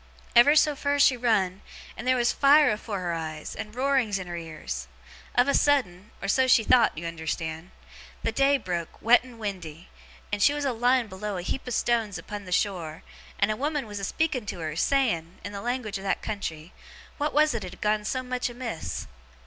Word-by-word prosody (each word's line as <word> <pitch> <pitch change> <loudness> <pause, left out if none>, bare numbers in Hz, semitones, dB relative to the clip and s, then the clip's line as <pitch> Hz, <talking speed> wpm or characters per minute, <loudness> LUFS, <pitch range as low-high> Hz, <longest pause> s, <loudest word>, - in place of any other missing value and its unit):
Ever 245 +6 +7
so 300 -1 +4
fur 285 +1 0
she 280 -2 +5
run, 205 -6 +1 0.3
and 240 - -7
there 255 - +4
was 240 -1 +2
fire 290 0 +5
afore 210 -2 -4
her 175 -1 -2
eyes, 155 -2 -5
and 215 0 -7
roarings 255 -6 +1
in 185 - -5
her 175 -1 -6
ears. 155 - -6 0.5
Of 245 +1 +4
a 280 - +2
sudden 210 -10 +1
or - - -2
so 260 +6 +3
she 245 -3 +5
thowt, 235 -6 +4
you 165 - -5
unnerstand 160 0 -4 0.5
the - - 0
day 275 +1 +3
broke, 175 -7 -5
wet 240 +2 +5
and 250 -2 -13
windy, 185 -6 -6 0.4
and 205 - -1
she 285 - +5
was 290 -1 -2
lying 245 -1 +2
b'low 200 0 -5
a 175 - -4
heap 255 +8 -4
of 245 - -2
stone 230 -3 +1
upon 205 -1 -7
the 180 - -9
shore, 170 -5 -1 0.3
and 215 - +2
a - - -1
woman 290 +2 -2
was 205 -1 -6
a - - -7
speaking 270 0 -1
to 195 - -4
her, 155 -1 -4
saying, 180 -7 +1
in 205 - -5
the 200 -1 -6
language 235 -4 -3
of - - -10
that 195 - -1
country, 170 -6 -5 0.5
what 295 +1 0
was 305 -1 +3
it 230 - -3
as 185 - -6
had 180 - -13
gone 210 0 +1
so 255 +4 -2
much 250 0 -2
amiss? 240 -8 -5
215 Hz, 210 wpm, -26 LUFS, 180-255 Hz, 0.5 s, Ever